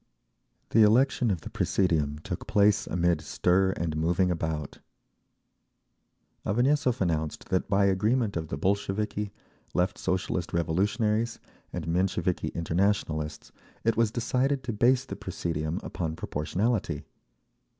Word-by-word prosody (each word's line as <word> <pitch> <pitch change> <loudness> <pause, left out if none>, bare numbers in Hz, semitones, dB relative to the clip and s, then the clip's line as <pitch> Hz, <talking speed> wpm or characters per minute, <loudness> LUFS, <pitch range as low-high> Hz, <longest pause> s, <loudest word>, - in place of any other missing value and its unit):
The 115 - +4
election 120 +3 +4
of 90 -5 -1
the - - -7
presidium 80 -6 +1
took - - -5
place 105 0 +3
amid 85 -2 +1
stir 90 +5 +2
and 85 -4 -2
moving 85 +3 +2
about. 80 -4 -3 1.6
Avanessov 125 +3 +2
announced 80 -4 -1
that 95 +1 0
by 100 0 +3
agreement 105 +3 +1
of 80 -1 -2
the 70 - -4
Bolsheviki, 100 +3 -1 0.4
Left 90 +1 +1
Socialist 90 -1 -1
Revolutionaries 105 +7 +1 0.3
and 85 -3 -5
Mensheviki 90 0 0
Internationalists, 85 -2 -1 0.3
it 115 - +2
was 115 -1 +3
decided 130 +4 0
to 120 -1 -3
base 125 +4 +3
the - - -6
presidium 80 +1 -3
upon 80 -2 -3
proportionality. 85 0 -1
95 Hz, 120 wpm, -28 LUFS, 80-110 Hz, 1.6 s, The